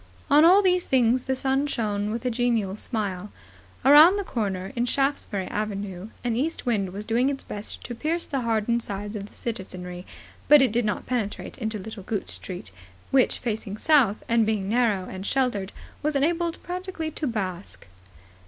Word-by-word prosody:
On 295 +2 +7
all 375 +5 +7
these 365 -1 +2
things 250 -1 +3
the 265 - 0
sun 270 +2 0
shone 210 -6 -1
with 230 +3 -4
a 250 - +1
genial 230 -5 0
smile. 210 -3 -3 0.5
Round 305 +8 +8
the 405 - -1
corner, 195 - -3
in 240 0 +1
Shaftesbury 270 -8 0
Avenue, 205 -2 -4
an 240 -2 0
east 300 +7 -2
wind 205 -6 0
was 205 +3 -6
doing 240 +4 +2
its 275 -1 -4
best 205 0 -6
to 240 - -5
pierce 320 +8 -2
the 270 -2 -2
hardened 230 0 +1
hides 205 0 -5
of 200 -1 -5
the - - -21
citizenry; 180 -5 -6 0.4
but 295 +1 +9
it 265 -5 +4
did 235 +1 +1
not 210 -2 -2
penetrate 235 -3 -3
into 220 -2 -2
Little 210 +1 -8
Gooch 200 +1 -3
Street, 175 - -6 0.4
which, 265 -2 +3
facing 215 -3 -4
south 255 -6 +3
and 230 -1 +3
being 210 -3 0
narrow 215 -4 +2
and 190 0 -7
sheltered, 210 -5 0 0.3
was 300 0 -1
enabled 330 +4 0
practically 360 -3 -4
to 305 0 -3
bask. 195 -5 -4
230 Hz, 175 wpm, -25 LUFS, 205-270 Hz, 0.5 s, but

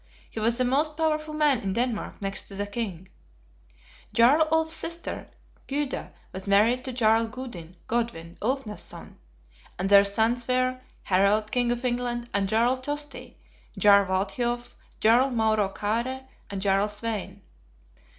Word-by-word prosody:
He - - -5
was 230 +2 +1
the 255 - +2
most 300 +4 +1
powerful 310 -1 -1
man 295 -5 +3
in 195 -3 -3
Denmark 235 -2 -2
next 195 0 -3
to 200 - -8
the 205 +1 -2
King. 200 -4 -5 1.0
Jarl 280 +7 +5
Ulf's 320 0 +2
sister, 335 +1 -3 0.4
Gyda, 280 0 -3 0.2
was 190 +1 -6
married 220 +6 +3
to 260 - -2
Jarl 225 -2 +3
Gudin 220 -9 -9
(Godwin) 225 -8 -3
Ulfnadson; 235 -2 -4 0.6
and 190 +2 -1
their 200 0 +8
sons 225 +4 +1
were, 255 0 0 0.2
Harald 200 +3 +2
King 245 -1 +1
of 240 +1 -3
England, 240 -1 -2
and 195 -1 0
Jarl 235 +4 +2
Tosti, 290 +3 -5 0.4
Jarl 200 -2 +6
Walthiof, 240 +6 -2 0.3
Jarl 240 +5 +4
Mauro 220 -4 +1
Kaare, 235 +7 -2 0.2
and 195 -1 -4
Jarl 195 +1 +2
Svein. 205 -2 -4
230 Hz, 140 wpm, -26 LUFS, 200-255 Hz, 1.0 s, their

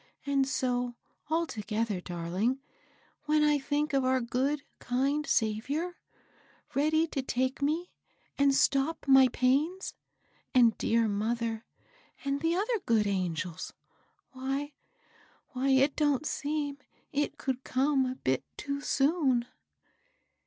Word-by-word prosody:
And 275 -1 +2
so, 245 -2 -1 0.3
altogether, 225 - -1
darling, 180 +9 -1 0.7
when 300 0 +3
I 295 -1 +4
think 290 +2 -1
of 270 -1 +3
our 260 0 +3
good, 265 +4 -1 0.2
kind 275 +4 0
Saviour, 275 +11 0 0.7
ready 310 +3 +3
to 275 - -2
take 260 +1 -1
me 315 +5 0 0.4
and 280 -1 +3
stop 280 +4 +1
my 270 -1 +8
pains, 280 - +1 0.6
and 235 -3 +6
dear 230 0 +2
mother, 225 +2 -1 0.6
and 280 0 -1
the 330 +1 +1
other 435 +4 0
good 220 -2 +3
angels, 180 -4 -2 0.6
why 270 +3 -3 0.4
— - - -31
why, 260 +2 -1
it 270 +1 +4
don't 290 -1 +1
seem 290 -1 -2 0.3
it 290 0 -1
could 265 -2 -3
come 265 0 +2
a 255 - -3
bit 130 - -1
too 280 -1 -3
soon." 275 -5 +2
270 Hz, 120 wpm, -30 LUFS, 240-290 Hz, 0.7 s, my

